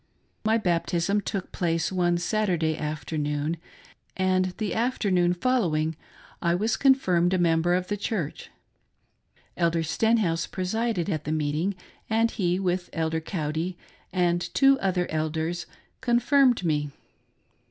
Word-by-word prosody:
My 220 +1 +3
baptism 175 0 0
took 195 -2 -4
place 165 -1 0
one 175 -2 +2
Saturday 175 -4 0
afternoon, 150 +1 -2 0.6
and 185 0 +2
the 215 -3 -2
afternoon 190 -7 +1
following 170 -9 +1 0.5
I 170 0 +2
was 215 +5 +1
confirmed 190 -10 +3
a - - +2
member 170 0 +3
of 180 0 -1
the 205 - -2
church. 195 -7 -3 1.1
Elder 165 -1 +1
Stenhouse 175 -1 +1
presided 195 0 -1
at 155 -6 -2
the 150 - -2
meeting, 155 +5 0 0.3
and 225 +1 +2
he, 180 -3 0
with 180 -1 -1
Elder 160 0 -1
Cowdy 160 +1 -3 0.3
and 175 -2 +1
two 275 -1 +5
other 185 -2 0
elders, 160 +2 -2 0.3
confirmed 245 -1 +3
me. 150 -2 0
175 Hz, 120 wpm, -26 LUFS, 165-205 Hz, 1.1 s, two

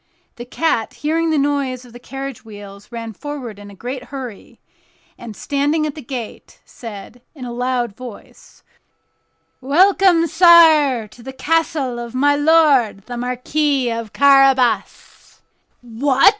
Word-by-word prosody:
The 240 - -8
cat, 245 -3 -1
hearing 325 +2 -1
the 315 - +1
noise 275 -3 -1
of 240 - -17
the 245 - -11
carriage 270 0 -8
wheels, 205 0 -12
ran 230 -1 -7
forward 255 -4 -8
in 205 0 -11
a 200 - -13
great 250 +5 -7
hurry, 255 -7 -9 0.6
and, 220 -3 -10
standing 290 +5 -1
at 300 - -3
the 305 - -9
gate, 240 -3 -8
said, 225 +1 -11
in 260 -4 -8
a 240 - -6
loud 245 -3 -2
voice: 250 -3 -13 1.0
"Welcome, 350 +4 +3
sire, 315 -7 +5
to 225 +3 -17
the 265 +3 -8
castle 290 -4 -1
of 235 +1 -8
my 285 +2 +3
lord 290 -9 +3
the 245 - -7
Marquis 250 +2 -1
of 230 -2 -5
Carabas." 270 -3 +1 0.4
"What!" 260 - +3
260 Hz, 140 wpm, -18 LUFS, 235-290 Hz, 1.0 s, sire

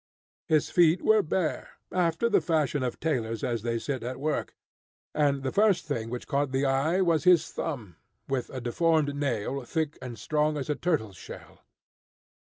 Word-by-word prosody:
His 155 -2 +2
feet 170 0 +4
were 220 -1 +5
bare, 165 -1 -2
after 180 +5 +1
the 220 - +3
fashion 155 -4 0
of 125 -2 -3
tailors 115 -8 -1
as 120 -3 -1
they 115 +1 -1
sit 130 +1 -3
at 125 +2 -5
work; 150 +1 -2 0.6
and 140 -2 +1
the 130 - -1
first 205 -4 +3
thing 115 -7 -3
which 125 +1 -5
caught 140 -1 0
the 135 +1 +1
eye 140 +7 +2
was 170 -4 +2
his 175 -3 +5
thumb, 115 - -5 0.3
with 135 -2 -2
a 130 - -5
deformed 145 +4 +1
nail 135 -1 -2
thick 155 +3 -2
and 125 -3 -7
strong 150 +6 0
as 145 +1 -2
a - - 0
turtle's 120 - -1
shell. - - -11
145 Hz, 175 wpm, -28 LUFS, 125-160 Hz, 0.6 s, were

